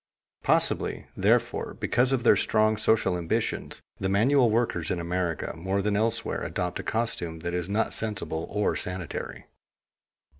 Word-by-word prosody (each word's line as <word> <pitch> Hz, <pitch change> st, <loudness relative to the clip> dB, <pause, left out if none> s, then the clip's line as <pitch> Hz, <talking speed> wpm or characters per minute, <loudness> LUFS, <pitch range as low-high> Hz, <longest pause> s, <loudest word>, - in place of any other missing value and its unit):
Possibly, -, -, +1 dB
therefore, -, -, +1 dB
because 125 Hz, +2 st, +1 dB
of 130 Hz, -3 st, +1 dB
their -, -, +6 dB
strong 110 Hz, 0 st, +2 dB
social 110 Hz, -3 st, +2 dB
ambitions, 85 Hz, -2 st, -2 dB, 0.2 s
the 95 Hz, -, -1 dB
manual 120 Hz, +6 st, +4 dB
workers 110 Hz, -7 st, 0 dB
in 95 Hz, -3 st, -1 dB
America 85 Hz, -1 st, -2 dB
more 95 Hz, +4 st, -1 dB
than 105 Hz, 0 st, +1 dB
elsewhere 110 Hz, +1 st, 0 dB
adopt 90 Hz, -1 st, -3 dB
a -, -, -4 dB
costume 85 Hz, -8 st, -1 dB
that 85 Hz, +1 st, -3 dB
is 90 Hz, +1 st, -2 dB
not 105 Hz, +3 st, 0 dB
sensible 95 Hz, -7 st, -2 dB
or 105 Hz, 0 st, 0 dB
sanitary. 90 Hz, -3 st, -5 dB
100 Hz, 145 wpm, -27 LUFS, 85-110 Hz, 0.2 s, their